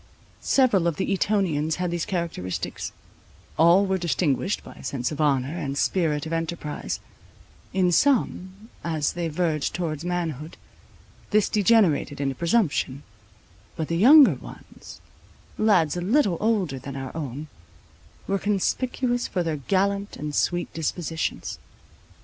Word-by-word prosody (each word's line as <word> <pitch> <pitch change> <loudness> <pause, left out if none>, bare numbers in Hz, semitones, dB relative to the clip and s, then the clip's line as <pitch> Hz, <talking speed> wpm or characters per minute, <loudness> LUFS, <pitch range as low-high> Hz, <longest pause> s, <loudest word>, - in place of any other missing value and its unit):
Several 225 -10 +3
of 170 - 0
the 195 - -1
Etonians 175 -7 +1
had 180 -1 -2
these 170 -1 -2
characteristics; 170 - -3 0.6
all 170 +5 +5
were 190 -1 0
distinguished 170 +1 0
by - - -11
a - - -14
sense 125 -1 -2
of 150 0 -3
honour, 140 0 +1
and 140 -5 -3
spirit 155 -3 +1
of 160 - -4
enterprize; 165 -2 -3 0.7
in 185 -2 +2
some, 210 -3 +1
as 155 -3 -1
they 175 -1 -2
verged 155 -2 -1
towards 160 -3 -3
manhood, 165 -4 -3 0.7
this 215 -1 +3
degenerated 200 -9 +3
into 135 -1 0
presumption; 150 - 0 0.7
but 160 - -4
the 165 - 0
younger 275 - +8
ones, - - -12 0.6
lads 185 -9 +3
a 175 - -3
little 200 - +2
older 195 -11 0
than 140 +1 -8
our 135 +1 -6
own, 145 -2 -5 0.8
were 195 0 0
conspicuous 245 +5 0
for 180 - -1
their 160 -2 -2
gallant 200 +6 0
and 150 0 -5
sweet 175 +3 0
dispositions. 160 0 -3
170 Hz, 130 wpm, -25 LUFS, 150-195 Hz, 0.8 s, younger